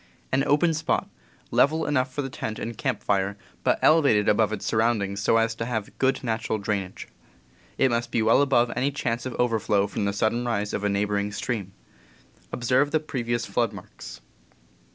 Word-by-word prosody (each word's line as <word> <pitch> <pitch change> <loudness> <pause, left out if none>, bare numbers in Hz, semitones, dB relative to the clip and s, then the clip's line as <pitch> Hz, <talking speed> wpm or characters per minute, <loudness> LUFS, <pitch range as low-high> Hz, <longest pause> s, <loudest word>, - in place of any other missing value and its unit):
An 135 +1 +2
open 160 +4 +3
spot, 155 0 -1 0.4
level 160 +3 +3
enough 130 -2 0
for 145 +2 -3
the 135 - -4
tent 110 -3 -5
and 115 0 -5
camp 120 -2 -2
fire, 100 0 0 0.3
but - - +3
elevated 140 -10 +4
above 105 0 +3
its 110 -2 -4
surroundings 110 -3 0
so 115 - +3
as 115 0 +2
to 115 +1 -4
have 110 -4 -4
good 135 +1 +1
natural 110 -2 -1
drainage. 100 -2 -3 0.7
It 135 -1 +3
must 120 0 -1
be 115 -1 0
well 115 +5 +5
above 125 -4 +3
any 130 +4 +1
chance 125 -4 -2
of 130 - -6
overflow 110 -4 +1
from 100 0 -3
the 100 - +1
sudden 110 +4 0
rise 105 -4 -2
of 100 - -2
a 105 - +1
neighbor 100 +1 0
ing 100 +1 -2
stream. 100 -3 -4 0.8
Observe 125 +4 +2
the 155 +1 +1
previous 120 -6 -2
flood 115 -3 0
marks. 100 -3 -11
115 Hz, 185 wpm, -25 LUFS, 105-130 Hz, 0.8 s, well